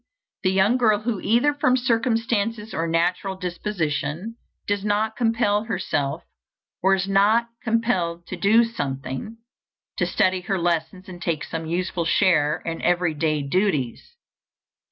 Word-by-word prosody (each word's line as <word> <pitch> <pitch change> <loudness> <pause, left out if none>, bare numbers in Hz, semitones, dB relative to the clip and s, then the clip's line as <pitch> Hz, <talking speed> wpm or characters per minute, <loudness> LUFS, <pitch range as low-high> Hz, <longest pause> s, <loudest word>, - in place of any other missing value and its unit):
The 185 - +2
young 195 +6 +3
girl 215 -4 +3
who, 220 -2 -2
either 240 +7 +3
from 255 -3 +2
circumstances 230 -3 0
or 165 +1 -1
natural 175 +4 0
disposition, 175 0 -3 0.3
does 205 -1 -1
not 215 +1 0
compel 225 -2 +1
herself, 165 -8 -2 0.6
or 195 +1 +4
is 190 0 -2
not 210 +4 +3
compelled 190 -7 0
to - - -6
do 210 +6 +4
something 140 - -4 0.6
to - - +1
study 185 -3 +1
her 195 +2 -1
lessons 170 +1 -1
and 180 -2 -10
take 165 -3 -1
some 165 -1 -5
useful 175 0 -2
share 165 -4 +2
in 165 0 -4
every 175 -2 +1
day 155 -1 0
duties. 150 - -1
190 Hz, 135 wpm, -23 LUFS, 170-220 Hz, 0.6 s, or